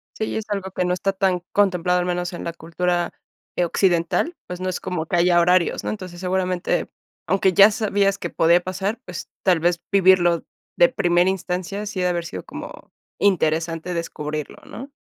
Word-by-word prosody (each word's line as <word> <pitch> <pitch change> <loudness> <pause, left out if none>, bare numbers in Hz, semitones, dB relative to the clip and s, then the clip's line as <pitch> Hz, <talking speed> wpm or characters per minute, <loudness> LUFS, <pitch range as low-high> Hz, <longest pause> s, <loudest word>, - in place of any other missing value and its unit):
Sí, 220 - -3
es 220 - -4
algo 195 -2 -3
que 180 - -1
no 180 - +1
está 195 +2 -1
tan 190 -2 +1
contemplado, 180 -3 +2
al 180 - -1
menos 180 0 -2
en 175 - -6
la 170 - -4
cultura, 175 +1 -1 0.4
eh, 175 - +2
occidental, 175 - +1
pues, 180 0 -6
no 185 - -2
es 185 - -3
como 180 -4 -3
que 175 - -2
haya 175 0 +4
horarios, 175 0 +2
¿no? - - -3
Entonces, 185 -4 -6
seguramente, 185 0 -1 0.4
aunque 195 -1 +2
ya 200 +3 +8
sabías 200 -3 +1
que 175 - -5
podía 170 +2 +3
pasar, 195 +5 -3
pues, 180 - -7
tal 180 -4 +3
vez 175 +1 +1
vivirlo 185 -3 +4 0.3
de - - +6
primera 175 +1 +2
instancia, 185 +1 -3
sí 205 -2 -5
ha - - +1
de 180 - +3
haber 170 -1 -2
sido 95 - -6
como - - -10 0.3
interesante 165 -2 +1
descubrirlo, 150 -3 -4
¿no? 270 +4 -9
180 Hz, 185 wpm, -22 LUFS, 175-190 Hz, 0.4 s, ya